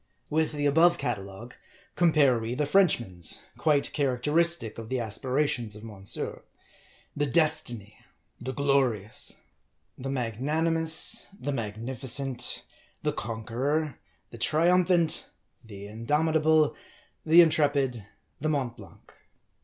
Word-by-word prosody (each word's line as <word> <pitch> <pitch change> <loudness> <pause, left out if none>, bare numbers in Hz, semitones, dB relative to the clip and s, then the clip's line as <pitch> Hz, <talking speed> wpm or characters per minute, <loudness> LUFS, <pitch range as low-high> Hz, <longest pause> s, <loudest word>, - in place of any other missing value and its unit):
With 160 0 0
the 145 -1 -2
above 165 +4 +4
catalogue, 105 +1 -5 0.4
compare 150 -8 +3
we 115 +2 -4
the 150 - 0
French 185 +1 +4
man's; 90 -7 -1 0.2
quite 150 -3 +1
characteristic 145 -1 +1
of 110 -1 -9
the 130 - -1
aspirations 120 0 -2
of 105 - -12
Monsieur: 100 -3 -3 0.7
The 145 0 -1
Destiny, 135 -9 -1 0.4
the 130 - -5
Glorious, 130 -7 0 0.6
the 135 +1 -5
Magnanimous, 155 +7 +1
the 145 - -3
Magnifi 110 -3 -5
MARDI. 130 - -4
in 130 +1 -7
cent, 130 0 +3 0.4
the - - 0
Conqueror, 120 +7 -3 0.3
the 115 - -11
Triumphant, 170 +3 +2 0.4
the 100 -3 -11
Indomitable, 155 +7 +1 0.5
the 165 +2 +7
Intrepid, 145 -7 +1 0.4
the 155 - -2
Mont 135 -6 -2
Blanc. - - -16
135 Hz, 115 wpm, -27 LUFS, 115-155 Hz, 0.7 s, the